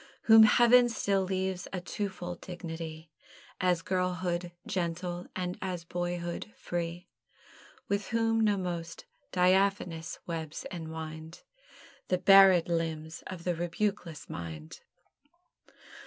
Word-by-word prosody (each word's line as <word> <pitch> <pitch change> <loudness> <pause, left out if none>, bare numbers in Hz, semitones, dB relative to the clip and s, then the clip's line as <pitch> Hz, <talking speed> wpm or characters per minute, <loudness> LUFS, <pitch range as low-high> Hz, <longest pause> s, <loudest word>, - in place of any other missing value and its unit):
Whom 225 0 +8
Heaven 240 +1 +6
still 200 -4 +1
leaves 190 -1 -2
a 185 - -3
twofold 180 -2 -5
dignity, 165 -3 -7 0.5
As 180 -2 +1
girlhood 180 -1 -1
gentle, 175 0 -3
and 180 -1 -3
as 180 -3 -3
boyhood 175 +2 -4
free; 175 +1 -4 0.8
With 200 0 -1
whom 225 -1 +1
no 210 -2 +3
most 170 -3 -5 0.3
diaphanous 180 -2 +1
webs 160 -3 -5
enwind 160 -1 -7 0.6
The 185 - +2
barèd 195 -2 +7
limbs 165 -1 -3
of 185 -2 -7
the 180 - 0
rebukeless 175 -1 -3
mind. 80 -2 -7
175 Hz, 105 wpm, -30 LUFS, 165-190 Hz, 0.8 s, Whom